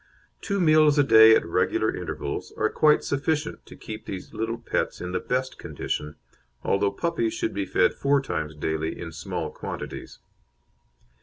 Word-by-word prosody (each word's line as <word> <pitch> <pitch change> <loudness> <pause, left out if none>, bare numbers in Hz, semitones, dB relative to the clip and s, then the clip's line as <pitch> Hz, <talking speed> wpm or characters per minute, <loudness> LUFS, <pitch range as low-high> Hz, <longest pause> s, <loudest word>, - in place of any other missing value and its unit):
Two 200 -2 -1
meals 155 -3 +5
a 145 - +6
day 110 -4 +8
at - - +1
regular 85 - +1
intervals - - -5
are 110 - +1
quite 150 -1 +4
sufficient 145 +2 -1
to - - -11
keep 110 -1 -9
these 95 -2 -7
little 115 +1 -2
pets 115 - -2
in 90 - -5
the 90 - -1
best 130 +1 -2
condition, 75 0 -4 0.5
although 100 +1 +2
puppies 170 - -1
should 345 -1 -2
be - - -2
fed 485 - +3
four 140 0 +2
times 80 - -4
daily 80 +1 -2
in 85 -1 -6
small 85 0 -4
quantities. - - -7
115 Hz, 160 wpm, -25 LUFS, -, 0.5 s, day